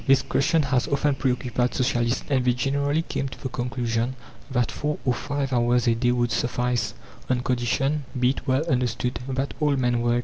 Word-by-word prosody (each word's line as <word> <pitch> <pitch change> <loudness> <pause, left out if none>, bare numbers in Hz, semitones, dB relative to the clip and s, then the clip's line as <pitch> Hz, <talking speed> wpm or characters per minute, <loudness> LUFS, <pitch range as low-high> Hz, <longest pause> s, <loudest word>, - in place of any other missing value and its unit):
This 135 0 +5
question 155 +3 +2
has 130 -2 +1
often 140 +1 +1
preoccupied 125 -2 0
Socialists, 120 -2 +1
and 130 -2 +3
they 125 0 +3
generally 140 +5 0
came 140 - -3
to 135 - -10
the 130 - -4
conclusion 120 0 -2 0.3
that 125 -3 0
four 150 0 -2
or 125 - +3
five 140 +1 -2
hours 120 0 +2
a 115 - +5
day 120 +2 +1
would 120 -1 +1
suffice, 120 0 0 0.3
on 125 -1 +2
condition, 130 +4 0
be 125 +1 +4
it - - -7
well 130 +4 +2
understood, 125 -4 0
that 135 +1 -2
all 150 -2 +2
men 125 -2 +1
work. 120 0 +2
125 Hz, 190 wpm, -25 LUFS, 120-135 Hz, 0.3 s, This